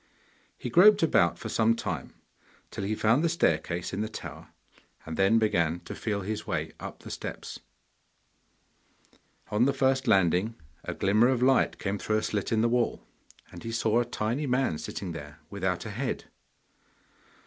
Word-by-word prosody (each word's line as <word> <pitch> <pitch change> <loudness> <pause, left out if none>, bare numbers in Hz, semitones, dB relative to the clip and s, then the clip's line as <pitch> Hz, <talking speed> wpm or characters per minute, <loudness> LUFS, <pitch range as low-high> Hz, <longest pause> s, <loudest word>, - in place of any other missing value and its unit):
He 125 - -5
groped 200 - +7
about 85 - +3
for - - -6
some 115 0 +3
time, 90 - -5 0.6
till - - -5
he 105 +2 -1
found 115 +8 +3
the 170 - +3
staircase 85 - 0
in 100 - -2
the 110 - -2
tower, 110 - -8 0.6
and 80 - -5
then 95 +5 +4
began 85 -7 +1
to 85 - -8
feel 105 -3 -2
his 105 +3 -4
way - - -2
up - - -8
the - - -8
steps. - - -6 1.9
On 105 +4 +3
the 140 - +2
first 130 0 +1
landing 95 +1 +3 0.3
a - - -5
glimmer 105 +5 +3
of 125 -1 +1
light 130 0 +3
came 100 +1 -3
through 110 - 0
a 110 - -1
slit 105 -2 -2
in 110 -1 +2
the 115 - +3
wall, 120 0 0 0.5
and - - -10
he 115 - -4
saw 115 0 +2
a 120 - +1
tiny 120 +5 -2
man 125 - +1
sitting 95 -3 -5
there, 75 -2 -8
without 95 -2 -2
a 110 - -5
head. 125 +5 -3
110 Hz, 170 wpm, -28 LUFS, 95-120 Hz, 1.9 s, groped